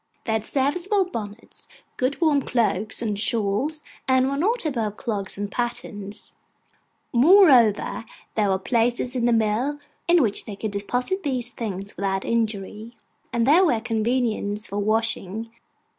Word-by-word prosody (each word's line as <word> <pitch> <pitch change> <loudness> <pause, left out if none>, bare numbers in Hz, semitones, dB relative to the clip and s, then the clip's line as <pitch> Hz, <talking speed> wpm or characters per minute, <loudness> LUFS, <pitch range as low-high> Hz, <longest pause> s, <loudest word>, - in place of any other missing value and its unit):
They 225 - 0
had 220 0 -1
serviceable 360 +9 +1
bonnets, 220 - -8 0.3
good 255 +2 -1
warm 305 -4 +3
cloaks, 220 -3 0
and 210 -3 -2
shawls; 230 +8 -1 0.2
and 260 0 +3
were 275 - -1
not 420 - 0
above 225 -8 -2
clogs 200 -6 -3
and 205 0 -4
pattens. 210 -4 -5 0.8
Moreover, 250 - +5 0.3
there 210 -2 +1
were 190 - +2
places 240 +5 0
in 240 -2 0
the 240 - +3
mill 230 +6 +1 0.3
in 345 -3 +5
which 210 -4 -1
they 210 - -6
could 215 +1 -4
deposit 245 - -2
these 255 -6 -2
things 200 -4 -5
without 195 -1 -2
injury; 220 0 -2 0.3
and 235 -1 +1
there 315 +8 +6
were 250 -11 +3
conveniences 220 -2 -1
for 200 +2 -4
washing. 220 0 -1
230 Hz, 145 wpm, -24 LUFS, 210-260 Hz, 0.8 s, there